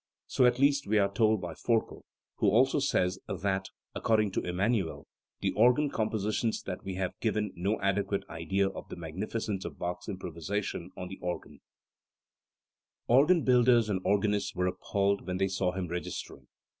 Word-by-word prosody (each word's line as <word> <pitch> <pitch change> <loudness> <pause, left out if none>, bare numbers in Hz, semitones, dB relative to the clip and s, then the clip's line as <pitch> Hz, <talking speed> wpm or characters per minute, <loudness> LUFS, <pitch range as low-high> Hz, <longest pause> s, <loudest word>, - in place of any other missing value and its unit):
So 125 - +3
at 125 0 +2
least 140 -1 +3
we 110 +1 +2
are 100 -1 +2
told 110 -1 +3
by 90 - -5
Forkel, 115 -2 -1 0.3
who - - +3
also 130 +6 +4
says 95 -9 +1
that, 95 +1 -1 0.3
according 110 -2 +2
to - - -1
Emmanuel, 95 0 -1 0.4
the - - +1
organ 125 +6 +4
compositions 110 0 -1
that 90 -2 -5
we 95 -1 -4
have 95 -1 -1
give 110 -2 0 0.2
no 95 +5 -1
adequate 100 0 0
idea 90 +4 0
of - - -9
the - - -6
magnificence 95 +4 -4
of - - -7
Bach's 90 +4 -4
improvisation 90 0 -4
on 90 - -5
the 95 - -9
organ*. 90 0 -5 1.5
Organ 150 +7 +5
builders 120 -3 +4
and 95 -2 -1
organists 105 0 +1
were 90 0 0
appalled 100 +2 0
when 90 0 -1
they 95 +1 +2
saw 95 -1 0
him 90 -1 -3
registering. 90 +1 -6
100 Hz, 160 wpm, -30 LUFS, 90-110 Hz, 1.5 s, Organ